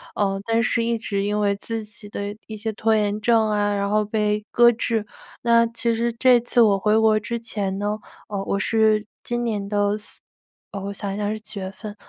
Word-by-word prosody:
呃， 195 -1 0
但 230 0 +2
是 230 -1 +1
一 230 0 0
直 200 -3 -2
因 205 +1 0
为 200 -1 +2
自 225 +2 -5
己 210 0 -12
的 205 0 -4
一 220 - -7
些 220 +1 -3
拖 220 +1 +2
延 210 -1 0
症 220 0 +3
啊， 205 -1 +1
然 200 0 -1
后 210 +1 +2
被 210 0 0
搁 240 0 +6
置。 225 -2 -1 0.3
那 235 -1 +4
其 230 0 -1
实 235 +1 0
这 245 +1 +5
次 240 0 +2
我 205 -3 +5
回 210 +2 +3
国 220 -1 +4
之 235 +2 -4
前 200 -4 -3
呢， 205 +1 -1 0.3
呃， 200 -2 -3
我 200 - -1
是 220 0 +3 0.2
今 240 0 -2
年 210 -4 -2
的 205 0 +1
4 210 - -10 0.5
呃， 200 - -5
我 200 +1 -4
想 200 0 -4
一 - - -5
下 205 -1 -1
是 215 +1 -3
几 215 -1 -7
月 190 -1 -4
份 205 +1 -9
215 Hz, 235 characters per minute, -23 LUFS, 205-230 Hz, 0.5 s, 搁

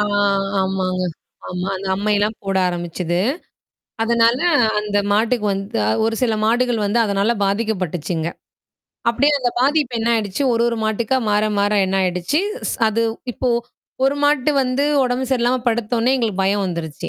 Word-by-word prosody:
ஆ, - - +4 0.6
ஆமாங்க. 185 -1 -1 0.5
ஆமா. 180 +1 -3
அந்த 190 +1 -6
அம்மையல்லாம் 210 +2 0
போட 195 0 -1
ஆரம்பிச்சது. 175 0 -3 0.9
அதனால 235 +1 +3 0.4
அந்த 210 -1 -2
மாட்டுக்கு 220 +1 +1
வந்து 195 - -3 0.2
ஒரு 225 0 0
சில 235 -3 +2
மாடுகள் 240 0 +1
வந்து 220 +4 +1
அதனால 200 +2 +1
பாதிக்கப்பட்டுச்சுங்க. 180 -6 -2 0.8
அப்டியே 280 +5 +2
அந்த 245 -2 0
பாதிப்பு 280 -2 +1
என்ன 225 +1 -1
ஆயிடுச்சு. 215 +3 -1
ஒரு 230 - +1
ஒரு 235 - -2
மாட்டுக்கா 220 +3 0
மாற 210 +1 +2
மாற 205 +1 +2
என்ன 190 - -2
ஆயிடுச்சு. 180 - 0 0.3
ஸ் - - -3
அது 230 +2 0 0.3
இப்போ 255 +1 -1 0.5
ஒரு 275 +1 +2
மாட்டு 290 -1 +2
வந்து 255 +2 0 0.2
உடம்பு 250 +1 -1
சரியில்லாம 250 0 +2
படுத்தோனே 235 +2 0
எங்களுக்கு 215 -6 -1
பயம் 200 +1 +1
வந்துருச்சி. 165 -4 -5
215 Hz, 145 wpm, -20 LUFS, 190-245 Hz, 0.9 s, ஆ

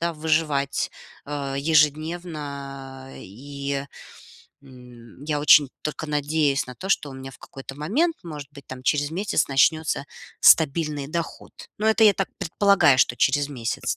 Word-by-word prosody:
да, 170 0 -1
выживать, 150 -3 0 0.3
а, 140 -1 -4
ежедневно. 145 -3 -1
И, 140 +6 -6 0.8
м, 125 -1 -15
я 150 -1 -1
очень 145 -2 +6
только 155 +1 -4
надеюсь 150 -1 0
на 125 - -9
то, 190 +7 -7
что 150 - +1
у 135 - -10
меня 135 0 -8
в - - -16
какой-то 135 0 -10
момент, 265 - 0
может 150 -5 -8
быть, 140 -3 -14
там 130 -1 -9
через 145 +2 0
месяц 195 +5 -1
начнется 155 +2 +2 0.4
стабильный 150 -2 +4
доход. 170 +1 -5 0.3
Но 215 - -1
это 220 0 +4
я 210 - +7
так 195 0 -2
предполагаю, 195 -6 +3
что 120 - +3
через 145 +2 +2
месяц, 120 -5 -3
145 Hz, 145 wpm, -23 LUFS, 135-160 Hz, 0.8 s, я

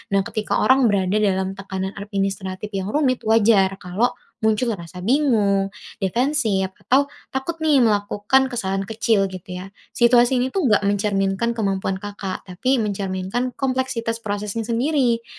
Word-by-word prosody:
Nah 195 - +4
ketika 215 +1 -2
orang 260 +3 +5
berada 200 0 +1
dalam 190 -2 +1
tekanan 190 -1 -4
administratif 195 -1 -3
yang 195 -1 -3
rumit, 265 -4 +2
wajar 210 -3 +4
kalo 190 +7 0 0.2
muncul 220 +2 +1
rasa 170 +1 -9
bingung, 205 -5 +2 0.2
defensif, 220 -2 0 0.2
atau 280 +2 +3 0.2
takut 265 +6 -3
nih 305 -5 +3
melakukan 210 +4 +2
kesalahan 195 -4 -2
kecil 220 -1 +1
gitu 185 0 -8
ya. 185 +2 -7 0.2
Situasi 240 +1 +5
ini 255 +1 -1
tuh 350 -10 +1
nggak 205 -1 +3
mencerminkan 200 +2 0
kemampuan 195 -2 -1
Kakak, 200 -1 -6
tapi 200 +9 0
mencerminkan 200 +2 -2
kompleksitas 255 -4 -1
prosesnya 210 +1 -3
sendiri. 235 0 +1
210 Hz, 135 wpm, -22 LUFS, 195-245 Hz, 0.2 s, orang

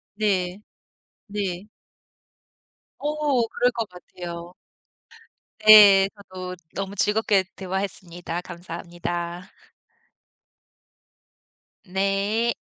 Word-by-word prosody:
네. 190 -3 0 0.7
네. 200 -2 -4 1.3
어 295 -5 0
그럴 245 +2 +1
것 230 -3 -3
같아요. 175 -1 -9 1.1
네. 200 -3 +10
저도 185 -2 -8 0.2
너무 195 0 -4
즐겁게 210 -1 +2
대화했습니다. 180 -2 -4
감사합니다. 175 +1 -6 2.4
네. 200 +5 0
195 Hz, 135 characters per minute, -24 LUFS, 180-210 Hz, 2.4 s, 네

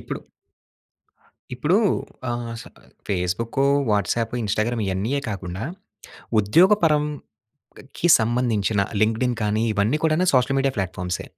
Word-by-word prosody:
ఇప్పుడు - - -6 1.4
ఇప్పుడు 150 +10 +2 0.5
ఆహ్, 120 -1 -4
స - - -11 0.4
ఫేస్‌బుక్కు, 100 +7 -1 0.3
వాట్సాప్, 110 +3 0
ఇన్స్టాగ్రామ్ 110 +3 -1
ఇయన్నీయే 105 +9 -1
కాకుండా, 95 -3 -5 0.8
ఉద్యోగ 165 - +5
పరంకి 150 -7 -1 0.8
సంబంధించిన 110 -3 0 0.2
లింక్డ్ఇన్ 115 +3 +1
కానీ 105 +1 0
ఇవన్నీ 105 +9 +1
కూడా 160 +3 +2
సోషల్ 130 +2 +2
మీడియా 135 -1 0
ప్లాట్‌ఫార్మ్సే. 90 -2 -3
115 Hz, 100 wpm, -23 LUFS, 100-135 Hz, 1.4 s, ఉద్యోగ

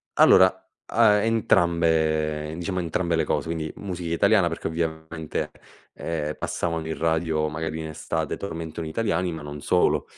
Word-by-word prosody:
Allora - - +6 0.3
a 105 -2 +4
entrambe 80 -7 +2
diciamo 90 +2 -3
entrambe 85 0 0
le 80 - +1
cose, - - -1
quindi 80 -2 -3
musica 90 -4 -4
italiana 100 0 +4
perché 85 - -3
ovviamente, 80 -1 -3 0.4
ehm, 75 -2 -3
passavano 80 -2 -2
in 80 - -3
radio 80 -1 0
magari 80 +1 -4
in 80 - -4
estate 80 0 -3
tormentoni 80 -3 -5
italiani, 90 -2 0
ma 80 - -6
non 75 0 -7
solo - - +2
80 Hz, 140 wpm, -25 LUFS, 80-85 Hz, 0.4 s, Allora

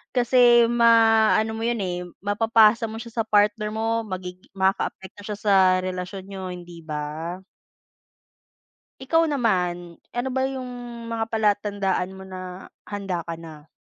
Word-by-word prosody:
kasi 240 -1 +5
ma-ano 225 -2 +4
mo - - -5
yun, 235 -1 0
eh, 180 -1 -3 0.2
mapapasa 225 +2 +4
mo 220 - -7
siya 235 -1 -7
sa - - -21
partner 210 0 +2
mo, 225 +1 0
magig 180 -1 -6 0.2
makaapekto 190 +1 -1
siya 210 -1 -4
sa 205 -1 +2 0.3
relasyon 185 +1 -5
niyo, 190 -2 -6
hindi 175 -1 -10
ba? 155 +3 -5 1.6
Ikaw 325 +5 +2
naman, 180 - -1 0.2
ano 245 +2 -1
ba 265 +1 0
yung 260 -2 -5 0.4
mga 225 -1 -2
palatandaan 205 -4 0
mo 190 - -10
na 185 0 -9 0.2
handa 195 -4 -3
ka 165 - -3
na? 160 -2 -12
205 Hz, 135 wpm, -24 LUFS, 180-230 Hz, 1.6 s, kasi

